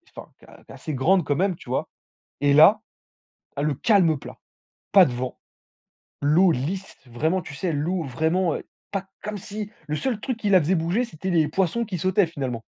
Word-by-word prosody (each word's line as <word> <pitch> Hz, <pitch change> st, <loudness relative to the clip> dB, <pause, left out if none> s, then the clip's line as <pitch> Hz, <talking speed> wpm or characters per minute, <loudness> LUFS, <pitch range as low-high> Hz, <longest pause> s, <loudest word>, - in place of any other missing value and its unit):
enfin -, -, -9 dB
qui -, -, -18 dB
est -, -, -18 dB
qui -, -, -15 dB
est -, -, -10 dB
assez 155 Hz, -, -6 dB
grande 175 Hz, +8 st, +3 dB
quand 145 Hz, -, 0 dB
même 190 Hz, 0 st, +1 dB
tu 140 Hz, -, -14 dB
vois 130 Hz, -, -1 dB, 0.5 s
et 145 Hz, 0 st, +3 dB
là, 160 Hz, +9 st, +7 dB, 0.8 s
tu -, -, -2 dB
as -, -, 0 dB
le 150 Hz, -1 st, +1 dB
calme 170 Hz, -, +3 dB
plat, -, -, -11 dB, 0.6 s
pas 195 Hz, -2 st, +8 dB
de 135 Hz, -, -2 dB
vent, 125 Hz, +1 st, -4 dB, 0.9 s
l'eau 165 Hz, +6 st, +4 dB
lisse 170 Hz, +8 st, -3 dB
vraiment 155 Hz, +10 st, -1 dB
tu 155 Hz, -4 st, -10 dB
sais 170 Hz, +4 st, -2 dB
l'eau 165 Hz, +5 st, -1 dB
vraiment, 160 Hz, +6 st, 0 dB
heu, -, -, -8 dB, 0.3 s
pas, 195 Hz, -1 st, -3 dB, 0.2 s
comme 210 Hz, 0 st, -4 dB
si, 210 Hz, +1 st, -6 dB, 0.2 s
le 150 Hz, -, -3 dB
seul 240 Hz, +3 st, -2 dB
truc 250 Hz, 0 st, -3 dB
qui 210 Hz, -3 st, -1 dB
la 190 Hz, -, +7 dB
faisait 165 Hz, +4 st, +1 dB
bouger 175 Hz, +8 st, 0 dB
c'étaient 190 Hz, -5 st, -5 dB
les 165 Hz, -3 st, +3 dB
poissons 190 Hz, +7 st, 0 dB
qui 190 Hz, -5 st, -5 dB
sautaient 185 Hz, +3 st, +2 dB
finalement. 130 Hz, -8 st, -5 dB
170 Hz, 210 wpm, -24 LUFS, 145-195 Hz, 0.9 s, pas